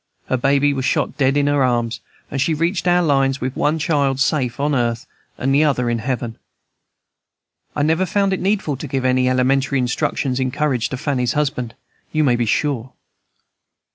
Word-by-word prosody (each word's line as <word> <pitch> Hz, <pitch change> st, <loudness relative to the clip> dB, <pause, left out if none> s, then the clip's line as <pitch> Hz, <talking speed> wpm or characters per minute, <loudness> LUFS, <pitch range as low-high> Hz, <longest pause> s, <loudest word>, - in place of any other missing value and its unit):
Her 130 Hz, -, +1 dB
baby 140 Hz, +3 st, +2 dB
was 135 Hz, -1 st, -3 dB
shot -, -, 0 dB
dead 135 Hz, 0 st, +2 dB
in 145 Hz, -, +2 dB
her 145 Hz, -1 st, +2 dB
arms, 120 Hz, -2 st, 0 dB, 0.3 s
and 135 Hz, -, -1 dB
she 160 Hz, +3 st, +1 dB
reached 170 Hz, +3 st, -1 dB
our 175 Hz, 0 st, +4 dB
lines 135 Hz, -3 st, +2 dB
with 130 Hz, +1 st, -3 dB
one 150 Hz, +2 st, +1 dB
child 145 Hz, -4 st, 0 dB
safe 135 Hz, -3 st, 0 dB
on 145 Hz, +1 st, +1 dB
earth 120 Hz, -3 st, 0 dB, 0.3 s
and 135 Hz, +1 st, 0 dB
the 145 Hz, +2 st, +4 dB
other 125 Hz, -5 st, +1 dB
in 115 Hz, -, -1 dB
heaven. 120 Hz, -1 st, -3 dB, 1.4 s
I 145 Hz, -, 0 dB
never 160 Hz, +5 st, +1 dB
found 195 Hz, +2 st, +1 dB
it 190 Hz, -, -1 dB
needful 190 Hz, -7 st, 0 dB
to 150 Hz, -, -6 dB
give 130 Hz, -1 st, -2 dB
any 130 Hz, 0 st, +2 dB
elementary 135 Hz, +2 st, +1 dB
instructions 130 Hz, +1 st, -1 dB
in 130 Hz, 0 st, 0 dB
courage 130 Hz, -4 st, -1 dB
to 130 Hz, -, -4 dB
Fanny's 130 Hz, -4 st, -1 dB
husband, 140 Hz, -6 st, -2 dB, 0.4 s
you 155 Hz, 0 st, +1 dB
may 125 Hz, -4 st, +3 dB
be 120 Hz, -1 st, -1 dB
sure. 130 Hz, 0 st, -1 dB
135 Hz, 185 wpm, -20 LUFS, 125-150 Hz, 1.4 s, our